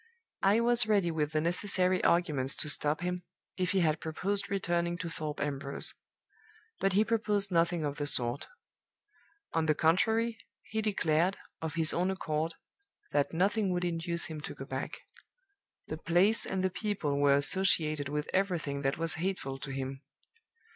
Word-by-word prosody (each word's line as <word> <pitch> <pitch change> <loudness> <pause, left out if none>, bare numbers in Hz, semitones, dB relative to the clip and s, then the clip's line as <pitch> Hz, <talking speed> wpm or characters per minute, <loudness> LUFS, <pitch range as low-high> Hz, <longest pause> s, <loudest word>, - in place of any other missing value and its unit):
I 205 +4 +4
was 240 -1 +4
ready 200 -5 +2
with 150 -2 -1
the 155 - +1
necessary 185 +2 +1
arguments 150 -6 +2
to 150 - +3
stop 150 +2 +2
him, 180 0 -2 0.3
if 180 -2 -1
he 195 -1 +2
had 155 -2 +1
proposed 195 +5 -2
returning 175 -3 -1
to 175 -1 -5
Thorpe 155 -2 -5
Ambrose. 140 -1 +2 0.9
But 195 -1 +1
he 210 +3 +4
proposed 210 -3 0
nothing 170 -1 +1
of 145 -1 -3
the 145 - -1
sort. 120 0 +1 1.1
On 160 -1 +1
the 155 - +3
contrary, 225 +9 +2 0.2
he 220 +1 -3
declared, 185 -3 +1 0.2
of 160 -1 -4
his 160 -2 +3
own 180 +2 +1
accord, 160 -3 -2 0.6
that 145 -1 +1
nothing 195 +3 +1
would 180 0 -1
induce 170 0 -2
him 155 -2 -6
to - - -7
go - - -8
back. - - -5 0.9
The - - -4
place 190 +6 +2
and 190 -1 -2
the 185 - +1
people 180 -9 -2
were 140 -1 +5
associated 155 -2 +2
with 150 +1 -2
everything 175 -7 0
that 135 0 0
was 165 0 +1
hateful 170 -8 -3
to 140 - -6
him. 135 0 -5
170 Hz, 160 wpm, -31 LUFS, 150-195 Hz, 1.1 s, were